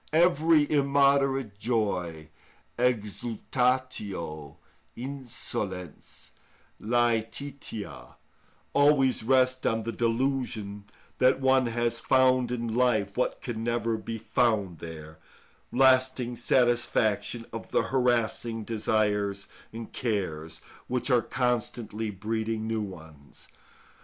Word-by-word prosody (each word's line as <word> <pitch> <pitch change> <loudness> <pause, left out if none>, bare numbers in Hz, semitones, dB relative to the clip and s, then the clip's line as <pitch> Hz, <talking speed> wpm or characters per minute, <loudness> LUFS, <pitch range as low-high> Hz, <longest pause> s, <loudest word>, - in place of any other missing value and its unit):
Every 160 -2 +4
immoderate 140 -5 +2
joy 95 -9 -1 0.5
(exultatio, 115 - -1 0.4
insolens 115 - -6 0.5
lætitia) 115 - -2 0.6
always 140 -2 +4
rests 130 +2 +2
on 115 0 0
the 115 - -3
delusion 115 -3 -1 0.3
that 130 +1 +4
one 130 -1 +3
has 115 0 -1
found 130 -2 +3
in 120 -2 -2
life 110 -5 +1
what 125 - -1
can 115 -3 -4
never 115 -1 0
be 115 +1 -5
found 105 -7 0
there—lasting 125 +11 -1
satisfaction 120 -2 +1
of 115 - -6
the - - +2
harassing 120 -3 0
desires 105 -2 0 0.2
and 115 0 -8
cares, 80 -9 -3 0.3
which 125 +2 -1
are 120 -1 +5
constantly 115 -3 -2
breeding 110 +2 -3
new 110 0 -1
ones. 80 -8 -10
115 Hz, 90 wpm, -28 LUFS, 105-130 Hz, 0.6 s, are